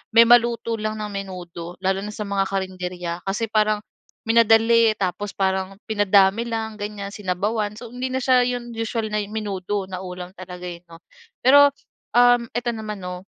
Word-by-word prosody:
may 230 - +10
maluto 235 -1 +4
lang 215 0 -2
na 210 - -3
menudo. 180 -3 -7
Lalo 190 +1 +1
na 210 - -5
sa 210 - -4
mga 200 -1 +1
karinderya, 180 -3 -4
kasi 210 +4 -1
parang 215 -1 +2 0.5
minadali. 225 0 +5
Tapos, 195 +1 -2
parang 190 0 -1
pinadami 205 +1 +3
lang 220 -1 -3
ganyan, 205 -1 -5
sinabawan. 205 +2 -2
So, 235 0 -9
hindi 255 +1 -3
na - - +1
siya 255 -1 +5
yung 245 -1 -4
usual 225 0 -2
na 210 - +1
menudo 205 -2 -3
na 185 -1 -5
ulam 180 -1 -7
talaga, 180 -1 -9
eh, 170 -1 -7
'no. 165 - -12 0.5
Pero, 285 +2 +8 0.5
um, 245 -1 +5
eto 240 +1 -2
naman 215 -2 -5
'no, 180 0 -6
210 Hz, 165 wpm, -23 LUFS, 190-230 Hz, 0.5 s, may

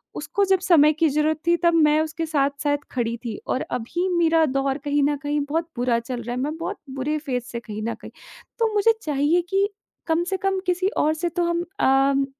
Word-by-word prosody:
उसको 405 - 0
जब 380 -1 +3
समय 320 -5 +5
की 320 - +5
ज़रूरत 305 +2 +1
थी 345 0 +4
तब 340 - +4
मैं 305 -2 +4
उसके 320 +1 -3
साथ-साथ 290 -1 0
खड़ी 235 -2 -2
थी 225 -3 -4
और 260 - 0
अभी 250 +10 -2
मेरा 325 -1 +4
दौर 270 -1 0
कहीं 290 0 +2
न 290 0 +1
कहीं 290 0 0
बहुत 330 +2 -1
बुरा 240 -1 +1
चल 240 +1 -5
रहा 240 +1 -5
है, - - -4
मैं 300 +4 -3
बहुत 330 - -4
बुरे 275 +3 -2
फ़ेज़ 255 -5 -3
से 235 - -4
कहीं 215 -2 -7
न 230 +1 -2
कहीं - - -10 0.5
तो 450 -2 +1
मुझे 420 +2 +4
चाहिए 300 +2 +1
कि 395 +1 +2 0.4
कम 325 +1 +2
से 380 +2 -2
कम 385 0 0
किसी 360 +1 +1
और 310 +1 +3
से 345 +2 -2
तो 345 +1 -1
हम 340 0 0 0.2
अम, 270 +1 +3
300 Hz, 220 wpm, -23 LUFS, 270-340 Hz, 0.5 s, समय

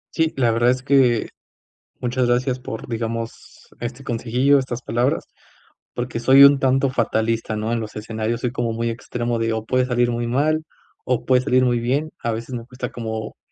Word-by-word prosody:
Sí, 160 -1 +2
la 120 -3 +3
verdad 120 +2 +3
es 125 0 0
que 130 -5 +3 0.7
muchas 125 0 0
gracias 125 +1 +1
por, 120 -1 -7
digamos 115 0 -5
este 125 +3 -6
consejillo, 125 +3 +2
estas 130 -2 -4
palabras, 120 +4 0 0.7
porque 120 -1 -3
soy 130 +3 +7
un 140 0 +7
tanto 135 0 +2
fatalista, 115 -2 0
¿no?, 110 +1 -2
en 120 - 0
los 110 -2 -7
escenarios 110 +2 -3
soy 125 - -1
como 120 -2 -2
muy 115 +1 -1
extremo, 120 0 -3
de, 115 0 0
o 110 -1 -2
puede 130 +2 +1
salir 120 -1 +1
muy 120 0 -2
mal 155 +6 +1 0.4
o 125 -2 0
puede 130 -1 +4
salir 130 -1 +3
muy 120 -1 +2
bien. 140 +6 -1
A 115 - -2
veces 115 +3 -5
me 115 -1 -6
cuesta 125 0 -6
como 110 -2 -5
120 Hz, 185 wpm, -21 LUFS, 115-130 Hz, 0.7 s, soy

